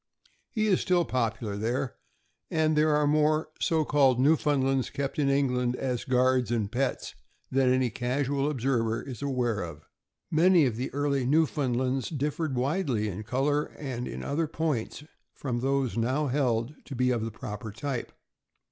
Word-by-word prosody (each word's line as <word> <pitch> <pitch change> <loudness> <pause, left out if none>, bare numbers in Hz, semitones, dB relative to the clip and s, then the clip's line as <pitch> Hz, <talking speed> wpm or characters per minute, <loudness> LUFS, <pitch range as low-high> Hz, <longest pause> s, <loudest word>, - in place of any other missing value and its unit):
He 215 -3 0
is 195 -4 +3
still 175 -2 +2
popular 115 -5 -1
there, 120 +5 -1 0.6
and 155 -1 +2
there 150 0 +3
are 150 0 +3
more 155 +1 +2
so 160 -2 +1
called 135 -4 +3
Newfoundlands 135 -2 +2
kept 140 +1 -3
in 140 -2 +2
England, 125 -3 +1
as 125 -3 -2
guards 130 0 +2
and 110 -3 -1
pets, 130 +1 -2 0.4
than 130 -1 +3
any 130 -2 +2
casual 135 +4 -1
observer 120 -5 0
is 130 -2 -8
aware 125 -6 0
of. 80 -3 -8 0.4
Many 170 0 +5
of 120 -4 0
the 125 +3 -3
early 140 -1 0
Newfoundlands 135 -4 +1
differed 150 -1 -2
widely, 130 - 0
in 100 +2 -5
color 135 +7 0
and 125 -4 -4
in - - -6
other 155 +3 -1
points, 150 -4 -2 0.3
from 125 -4 -3
those 135 -3 0
now 130 +6 +1
held 125 -2 0
to 140 - -7
be 125 +1 +2
of 120 -3 0
the 115 - -2
proper 110 0 -7
type. 135 +3 -4
135 Hz, 155 wpm, -28 LUFS, 120-150 Hz, 0.6 s, Many